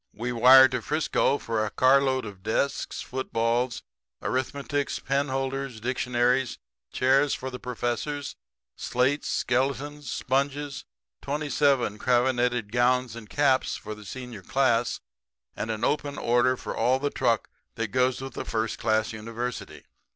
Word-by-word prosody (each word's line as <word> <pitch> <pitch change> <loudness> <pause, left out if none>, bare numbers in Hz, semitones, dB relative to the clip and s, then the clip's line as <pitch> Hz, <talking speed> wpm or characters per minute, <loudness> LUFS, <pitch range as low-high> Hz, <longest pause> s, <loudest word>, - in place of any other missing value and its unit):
We 120 +3 -3
wire 130 +3 +8
to 125 -1 -2
Frisco 150 0 +1
for 115 -5 -2
a 105 - -1
car 130 +5 +4
load 130 -2 0
of 100 -3 -9
desks, 110 +7 -1
footballs, 120 -1 -1 0.4
arithmetics, 140 +2 -2
penholders, 135 -2 -2
dictionaries, 125 +1 0 0.3
chairs 135 +2 +3
for 130 0 -6
the 125 - -7
professors, 125 +4 -3 0.4
slates, 130 +4 0
skeletons, 135 +2 -1
sponges, 140 +3 -1 0.4
twenty 145 +1 -3
seven 135 -8 +2
cravenetted 125 -3 +1
gowns 125 0 +2
and 115 -2 -10
caps 140 -3 +2
for 110 -1 -7
the 105 0 -11
senior 125 0 -8
class, 120 +1 +1 0.5
and 110 - -4
an 110 0 -3
open 145 +1 0
order 120 +2 +2
for - - -6
all 130 +1 +2
the 140 +1 -2
truck 115 -2 0 0.2
that 115 -1 -2
goes 130 +2 +1
with 135 -1 -7
a - - -2
first 110 0 -2
class 110 +2 +1
university. 115 +3 -6
125 Hz, 135 wpm, -26 LUFS, 115-135 Hz, 0.5 s, wire